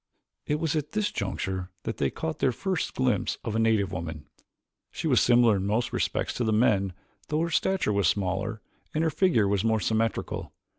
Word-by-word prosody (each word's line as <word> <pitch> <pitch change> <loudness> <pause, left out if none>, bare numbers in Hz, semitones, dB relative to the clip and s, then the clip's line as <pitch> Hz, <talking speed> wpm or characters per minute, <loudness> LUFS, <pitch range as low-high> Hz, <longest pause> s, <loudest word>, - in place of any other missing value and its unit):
It 150 +1 0
was 160 -2 0
at 150 -2 -2
this 210 -1 0
juncture 95 -1 -3
that 115 - -4
they - - +1
caught 160 -2 -4
their 130 - +3
first 185 - -2
glimpse 130 -1 +1
of 110 -2 -3
a - - +2
native 110 -4 +2
woman. 80 -4 -5 0.6
She - - -6
was - - +4
similar 120 -3 +5
in 95 +1 -2
most 110 +3 0
respects - - -1
to 125 - 0
the 110 - +1
men 100 -4 +2 0.3
though 155 +1 0
her 170 0 -1
stature 190 - +1
was 100 -4 +2
smaller 100 +4 -1 0.3
and 155 - +2
her 160 - +2
figure 150 - +3
more 110 +3 +2
symmetrical. 110 +3 -1
110 Hz, 190 wpm, -27 LUFS, 100-150 Hz, 0.6 s, similar